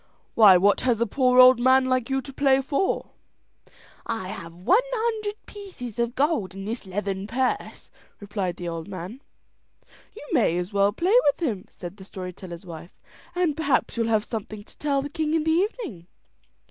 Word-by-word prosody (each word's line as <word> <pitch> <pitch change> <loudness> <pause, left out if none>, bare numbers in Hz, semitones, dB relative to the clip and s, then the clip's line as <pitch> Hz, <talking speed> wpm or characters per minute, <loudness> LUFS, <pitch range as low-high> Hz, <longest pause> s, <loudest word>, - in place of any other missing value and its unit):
Why 205 -5 +8
what 200 +3 +3
has 245 -4 +1
a 235 - +2
poor 250 +2 +2
old 255 -1 +8
man 260 +1 +4
like 255 -1 0
you 270 0 0
to 275 - -10
play 270 -1 +3
for?" 280 +7 -1 0.9
"I 225 -5 -4
have 170 -4 -7
one 280 - +3
hundred 445 -4 -2
pieces 360 - -9
of 235 0 -1
gold 270 - 0
in 195 0 -7
this 220 -1 -5
leathern 195 0 -3
purse," 255 +3 -2 0.3
replied 200 -4 -3
the 175 - -6
old 165 -1 -5
man. 195 +6 -8 0.9
"You 295 - -11
may 170 - +2
as 180 +3 -4
well 200 0 +3
play 350 - 0
with 305 +3 +2
him," 205 -7 -4
said 175 +2 -9
the 190 - -11
story 185 -1 -7
teller's 175 0 -10
wife; 170 0 -11 0.4
"and 350 -5 +1
perhaps 290 -4 0
you'll 230 -1 0
have 220 -2 +2
something 215 -2 -6
to - - -19
tell 280 -2 0
the - - -4
king 310 +1 -1
in 320 - +1
the 320 - +1
evening." 350 - -2
235 Hz, 185 wpm, -25 LUFS, 195-285 Hz, 0.9 s, Why